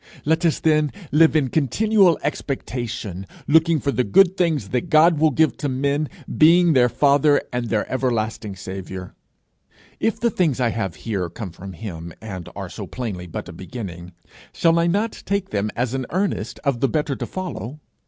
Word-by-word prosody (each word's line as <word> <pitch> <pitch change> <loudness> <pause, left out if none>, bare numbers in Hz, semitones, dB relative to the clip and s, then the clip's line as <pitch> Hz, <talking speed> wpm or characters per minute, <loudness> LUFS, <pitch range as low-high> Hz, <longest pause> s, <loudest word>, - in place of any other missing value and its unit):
Let 160 +3 +2
us, 160 - 0
then, 155 -2 +2 0.2
live 160 +2 +5
in 140 -4 +2
continual 185 - +3
expectation, 120 -9 -4 0.2
looking 160 +1 +4
for 140 - -1
the 125 - +1
good 180 - +4
things 155 - 0
that 125 -2 -2
God 155 +1 +5
will 160 0 +5
give 155 +3 +2
to 145 - -2
men, 140 +3 0 0.3
being 170 +2 +6
their 125 -3 +4
father 145 +2 +4
and 120 -1 -2
their 110 -2 0
everlasting 110 -5 -2
saviour. 95 -1 -7 0.9
If 225 - 0
the 235 -1 +1
things 160 -10 +1
I 125 -2 +2
have 100 -6 -3
here 95 -6 -2
come 95 +2 -7
from 95 +3 -9
him, 85 -4 -7
and 95 -6 -7
are - - -5
so - - -7
plainly 100 -8 -5
but 85 - -6
a - - -9
beginning, 90 -5 -8 0.4
shall 165 0 +3
I 170 - +2
not 205 +6 -1
take 200 -1 -1
them 105 0 0
as 125 +1 -1
an 130 -2 -3
earnest 175 - -2
of 140 -5 0
the 135 - +2
better 150 -3 -1
to - - -4
follow? 155 - -6
135 Hz, 180 wpm, -22 LUFS, 110-160 Hz, 0.9 s, being